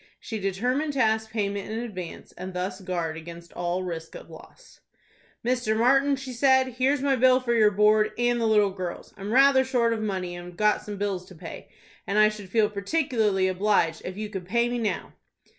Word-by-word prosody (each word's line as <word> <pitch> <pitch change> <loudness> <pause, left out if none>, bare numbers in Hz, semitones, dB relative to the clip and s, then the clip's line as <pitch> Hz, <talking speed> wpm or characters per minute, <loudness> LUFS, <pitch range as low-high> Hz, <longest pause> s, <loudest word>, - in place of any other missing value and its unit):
She 220 - -5
determined 250 +10 -1
to 275 - -3
ask 220 -2 +2
payment 205 -2 -3
in 220 - -3
advance, 200 -8 -7
and 185 0 -8
thus 185 +2 -3
guard 170 -4 -3
against 170 +1 -10
all 175 +1 -2
risk 165 -2 -6
of - - -11
loss. - - -15 0.7
"Mr. 240 -3 +1
Martin," 270 +4 +4
she 265 -1 -7
said, 260 +1 +3
"here's 260 +3 0
my 275 -1 +3
bill 255 +1 +5
for 245 -2 -1
your 215 -2 +5
board, 210 +1 +3
and 240 0 +1
the 225 - +2
little 210 -2 +4
girl's. 185 -2 -6
I'm 200 +2 -6
rather 265 +1 +6
short 245 -3 +1
of 220 - -3
money, 185 -4 -3
and 175 0 -8
have 175 -1 -12
got 210 0 +2
some 205 -1 -7
bills 195 -2 -2
to 185 - -13
pay, 160 - -10 0.4
and 200 - -1
I 215 0 +6
should 210 -3 -9
feel 215 +1 +3
particularly 210 -3 0
obliged 185 -4 +1
if 185 +1 -6
you 215 0 -3
could 190 -3 -6
pay 235 +4 +2
me 245 0 -2
now." 220 -3 -3
215 Hz, 205 wpm, -26 LUFS, 185-240 Hz, 0.7 s, rather